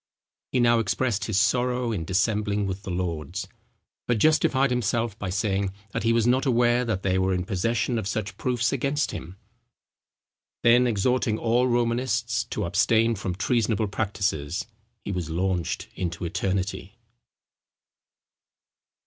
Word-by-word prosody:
He -, -, +1 dB
now 120 Hz, -1 st, +4 dB
expressed 110 Hz, +1 st, 0 dB
his 110 Hz, -4 st, -1 dB
sorrow 125 Hz, +3 st, +1 dB
in 90 Hz, -7 st, -3 dB
dissembling 105 Hz, +2 st, 0 dB
with 95 Hz, 0 st, -4 dB
the 95 Hz, -, -8 dB
lords, 85 Hz, -5 st, -3 dB, 0.6 s
but 120 Hz, -, +2 dB
justified 135 Hz, 0 st, +3 dB
himself 115 Hz, -2 st, 0 dB
by 100 Hz, -, -3 dB
saying, 95 Hz, 0 st, 0 dB, 0.2 s
that -, -, -2 dB
he 115 Hz, +2 st, +2 dB
was 115 Hz, -1 st, +2 dB
not 130 Hz, +3 st, +2 dB
aware 120 Hz, 0 st, +3 dB
that 105 Hz, -6 st, -2 dB
they 95 Hz, 0 st, +1 dB
were 95 Hz, 0 st, +1 dB
in 90 Hz, 0 st, -2 dB
possession 115 Hz, +5 st, 0 dB
of 100 Hz, -, -4 dB
such 105 Hz, 0 st, -3 dB
proofs 125 Hz, -1 st, 0 dB
against 140 Hz, +2 st, 0 dB
him. 90 Hz, +4 st, -8 dB, 1.3 s
Then 120 Hz, +1 st, +5 dB
exhorting 115 Hz, +1 st, +1 dB
all 120 Hz, +3 st, +2 dB
Romanists 120 Hz, -1 st, 0 dB
to 120 Hz, -, -3 dB
abstain 110 Hz, +6 st, +3 dB
from 95 Hz, -4 st, -4 dB
treasonable 110 Hz, 0 st, 0 dB
practices, 95 Hz, -6 st, -2 dB, 0.4 s
he -, -, -2 dB
was 90 Hz, -4 st, -3 dB
launched 90 Hz, 0 st, -1 dB
into 85 Hz, -1 st, -4 dB
eternity. 95 Hz, +2 st, -2 dB
110 Hz, 140 wpm, -25 LUFS, 95-120 Hz, 1.3 s, Then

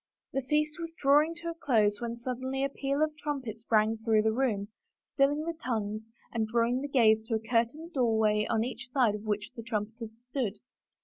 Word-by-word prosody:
The 270 Hz, -, 0 dB
feast 300 Hz, +4 st, 0 dB
was 330 Hz, -1 st, -6 dB
drawing 295 Hz, +4 st, +4 dB
to 340 Hz, 0 st, -5 dB
a -, -, -3 dB
close 225 Hz, -10 st, +2 dB
when 235 Hz, 0 st, -3 dB
suddenly 260 Hz, +2 st, -3 dB
a 275 Hz, -, +1 dB
peal 275 Hz, +2 st, 0 dB
of 310 Hz, -1 st, -1 dB
trumpets 255 Hz, -7 st, -4 dB
rang 220 Hz, 0 st, +3 dB
through 220 Hz, -1 st, +3 dB
the 220 Hz, -, +3 dB
room, 220 Hz, -5 st, 0 dB, 0.4 s
stilling 290 Hz, +2 st, +1 dB
the 335 Hz, -, -2 dB
tongues 215 Hz, -2 st, -2 dB, 0.3 s
and 225 Hz, -2 st, 0 dB
drawing 235 Hz, +3 st, +1 dB
the 285 Hz, -, -3 dB
gaze 225 Hz, -5 st, +4 dB
to 230 Hz, -, 0 dB
a -, -, +1 dB
curtained 250 Hz, +9 st, 0 dB
doorway 220 Hz, -4 st, +2 dB
on 225 Hz, -1 st, +2 dB
each 250 Hz, 0 st, -5 dB
side 250 Hz, -5 st, +3 dB
of 210 Hz, -, -5 dB
which 210 Hz, -1 st, -2 dB
the 230 Hz, -, -6 dB
tnmipeters 225 Hz, 0 st, -4 dB, 0.2 s
stood. 230 Hz, -7 st, -1 dB
235 Hz, 195 wpm, -30 LUFS, 220-275 Hz, 0.4 s, drawing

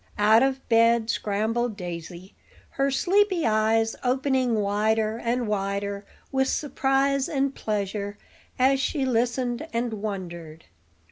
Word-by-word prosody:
Out 215 Hz, +2 st, +5 dB
of 265 Hz, 0 st, 0 dB
bed 230 Hz, -1 st, +4 dB
scrambled 220 Hz, +2 st, -1 dB
Daisy, 175 Hz, +1 st, -7 dB, 0.4 s
her 275 Hz, 0 st, 0 dB
sleepy 370 Hz, +5 st, +2 dB
eyes 225 Hz, 0 st, +2 dB
opening 260 Hz, -1 st, +1 dB
wider 215 Hz, +2 st, 0 dB
and 240 Hz, 0 st, -1 dB
wider 200 Hz, 0 st, -2 dB, 0.2 s
with 265 Hz, -1 st, +1 dB
surprise 275 Hz, -1 st, 0 dB
and 275 Hz, -1 st, 0 dB
pleasure 205 Hz, -2 st, -3 dB, 0.4 s
as 265 Hz, +1 st, +3 dB
she 275 Hz, 0 st, -1 dB
listened 245 Hz, +3 st, -1 dB
and 235 Hz, 0 st, -2 dB
wondered. 175 Hz, -6 st, -6 dB
230 Hz, 115 wpm, -25 LUFS, 205-265 Hz, 0.4 s, Out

